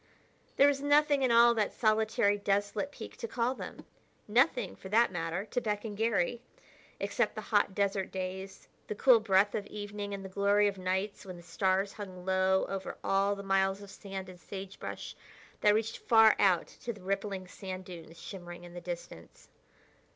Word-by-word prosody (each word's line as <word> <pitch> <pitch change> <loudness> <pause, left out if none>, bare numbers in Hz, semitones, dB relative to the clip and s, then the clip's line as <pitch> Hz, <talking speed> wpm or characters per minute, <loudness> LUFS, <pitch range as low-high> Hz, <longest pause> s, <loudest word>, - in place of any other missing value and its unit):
There 280 - +6
was 280 -1 +1
nothing 290 0 +4
in 255 -2 +3
all 235 0 +7
that 215 -3 0
solitary, 215 -1 +2
desolate 205 +7 -1
peak - - -10
to 465 - -5
call 245 - 0
them; - - -9 0.4
nothing, 235 -2 +2
for 190 - -10
that 225 +1 +4
matter, 175 +2 -3
to 245 +4 -2
beckon 210 0 -3
Garry, 225 +1 0 0.6
except - - 0
the - - -4
hot 190 - +3
desert 200 -1 0
days, 190 +1 -6 0.2
the 210 - -4
cool 245 +2 +6
breath 205 -1 +3
of 205 -1 -3
evening 205 0 -6
and 195 -1 -5
the - - -6
glory 200 +2 +3
of 200 -1 -3
nights 190 +2 -2
when 185 -3 -8
the 175 - -13
stars 190 +3 0
hung 185 -3 -9
low 190 0 +2
over 195 -1 -5
all 195 +1 +2
the 200 - -8
miles 195 0 +1
of 200 - -11
sand 195 -2 -7
and 180 -1 -12
sagebrush 195 +1 -7 0.4
that 210 0 +5
reached 220 0 -1
far 225 -2 +6
out 185 -4 +4
to 235 - -7
the 205 -4 -12
rippling 195 -1 -3
sand 185 0 -7
dunes 170 -2 -11
shimmering 175 -3 -9
in 175 0 -11
the 175 - -7
distance. 170 - -8
200 Hz, 180 wpm, -31 LUFS, 190-215 Hz, 0.6 s, all